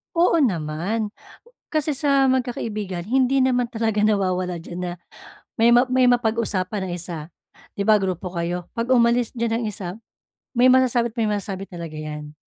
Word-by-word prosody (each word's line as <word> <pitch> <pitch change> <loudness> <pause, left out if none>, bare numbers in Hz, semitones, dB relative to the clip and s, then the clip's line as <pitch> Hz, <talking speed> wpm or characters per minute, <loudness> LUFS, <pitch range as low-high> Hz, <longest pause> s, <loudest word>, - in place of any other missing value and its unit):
Oo 340 0 +4
naman. 180 - -1 0.6
Kasi 305 -2 0
sa 275 -1 +3
magkakaibigan 215 -8 -2
hindi 260 +2 +2
naman 250 -2 +2
talaga 220 -2 0
nawawala 185 -4 +1
diyan 175 +2 -8
na - - -4 0.7
may 230 - +6
ma 245 +2 +6
may 255 0 +3
mapag-usapan 215 -5 0
ang - - -3
isa. 170 -1 -5 0.6
'Di 200 - 0
ba 215 0 +6
grupo 185 -1 -3
kayo 175 0 -3
'pag 230 +1 -3
umalis 235 -1 +3
diyan 230 0 0
ang - - -2
isa 190 -3 -5 0.7
may 245 - +6
masasabi't 245 -3 +3
may 220 -2 +1
masasabi 195 -1 -3
talaga 170 -3 -7
'yan. 150 -1 -7
215 Hz, 155 wpm, -23 LUFS, 180-245 Hz, 0.7 s, may